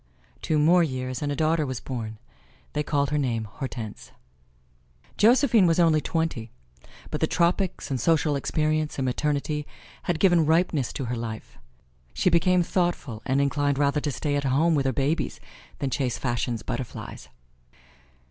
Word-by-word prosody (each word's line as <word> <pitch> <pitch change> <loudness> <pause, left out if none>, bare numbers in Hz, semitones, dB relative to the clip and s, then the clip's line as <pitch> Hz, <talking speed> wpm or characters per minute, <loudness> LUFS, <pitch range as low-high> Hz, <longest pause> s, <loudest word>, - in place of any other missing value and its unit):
Two 155 - 0
more 170 +4 +5
years 130 -5 -2
and 145 -1 -1
a - - -1
daughter 155 +1 +2
was 130 -5 -3
born. 110 -4 -5 0.6
They 150 - 0
called 140 -2 0
her 150 - +1
name 120 -5 -1
Hortense. 110 -1 -7 1.0
Josephine 230 -2 +5
was 165 +1 +2
only 160 -3 +4
twenty, 160 -10 -2 0.6
but - - -3
the - - +3
tropics 175 -2 0
and 130 - -1
social 160 -3 +2
experience 155 +2 -1
and 135 - -1
maternity 150 +3 -1 0.4
had 170 -3 +1
given 175 -3 +5
ripeness 160 -5 +2
to 135 - -4
her 120 +1 -2
life. 115 -1 -7 0.6
She 185 - +2
became 180 +1 +4
thoughtful 170 - -1
and 135 +1 +2
inclined 140 0 +1
rather 145 +1 +2
to 145 - -1
stay 145 +2 -2
at 145 - 0
home 145 +5 +2
with 140 -3 +1
her - - +2
babies 140 +5 -1 0.4
than 135 -2 -2
chase 125 -1 -1
fashion's 120 -2 -2
butterflies. 120 - -6
145 Hz, 155 wpm, -25 LUFS, 130-165 Hz, 1.0 s, more